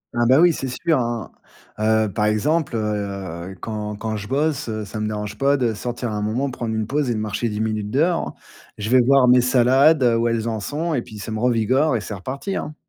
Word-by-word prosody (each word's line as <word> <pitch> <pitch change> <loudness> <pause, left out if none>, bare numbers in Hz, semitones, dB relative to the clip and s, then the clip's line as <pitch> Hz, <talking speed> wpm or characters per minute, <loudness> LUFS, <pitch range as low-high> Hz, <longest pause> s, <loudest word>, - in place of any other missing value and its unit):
Ah, 120 0 +2
bah, 130 +4 +6
oui, 175 0 +6
c'est 135 - -4
sûr 155 +4 0
hein. 120 -3 -3 0.5
Heu, 110 0 +2
par 105 - 0
exemple, 135 +8 +1
heu, 115 - 0 0.7
heu, 95 - -10
quand 105 -1 -4
quand 110 +1 -4
je 105 -1 -6
bosse, 145 0 -1
heu, 110 -1 -3
ça 110 - -6
me 105 - -1
dérange 105 -1 -4
pas 140 +1 +3
de 120 -4 0
sortir 120 +1 -4
un 105 0 -3
moment 125 +6 -1
prendre 115 -3 -4
une 110 -1 -1
pause 140 +1 -1
et 120 - 0
de 110 - -2
marcher 110 +2 -2
10 105 0 -4
minutes 110 -2 -2
dehors, 165 +8 +1
hein? - - -8 0.4
Je 105 +3 -4
vais 130 - +6
voir 130 +1 +4
mes 125 0 +6
salades, 130 +4 +4
heu, 120 -2 +4
où 115 - +1
elles 115 -1 -1
en 110 -2 -2
sont 155 +9 -3
et 125 - 0
puis 110 -2 -11
ça 105 +2 -6
me 110 - -3
revigore. 125 +4 +2
Et 110 - -1
c'est 105 - -6
reparti, 130 - -5
hein? 150 - -4
120 Hz, 245 wpm, -21 LUFS, 110-135 Hz, 0.7 s, bah